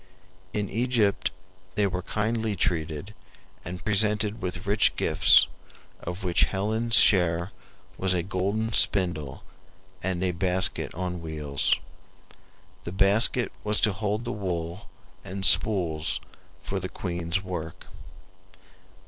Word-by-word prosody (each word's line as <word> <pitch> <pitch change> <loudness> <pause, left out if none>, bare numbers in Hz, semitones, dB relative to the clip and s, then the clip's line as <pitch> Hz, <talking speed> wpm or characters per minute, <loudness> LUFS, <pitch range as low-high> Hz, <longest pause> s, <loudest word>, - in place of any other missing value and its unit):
In 105 -1 -2
Egypt 115 -3 0 0.5
they 105 - +2
were 90 -2 -2
kindly 110 +2 -2
treated 80 +1 -2 0.5
and 90 +1 -8
presented 105 +1 0
with 90 +1 -5
rich 100 +1 +3
gifts, - - +5 0.5
of 90 +3 -7
which 90 -2 +3
Helen's 110 +4 -1
share 85 -2 +5 0.5
was 95 -1 +2
a 85 - -1
golden 100 +5 -2
spindle 85 -11 +1 0.6
and 90 0 -2
a 90 - +1
basket 90 +1 +1
on 90 0 -4
wheels. 75 -4 -1 1.1
The 85 - -6
basket 100 +6 +3
was 105 0 +1
to 105 - +3
hold 105 +3 -3
the 120 - -3
wool 90 -3 -5 0.3
and 95 +1 -3
spools 85 -8 +3 0.4
for 95 - -3
the 95 0 -5
queen's 85 0 -4
work. 85 -4 -7
95 Hz, 115 wpm, -26 LUFS, 85-105 Hz, 1.1 s, gifts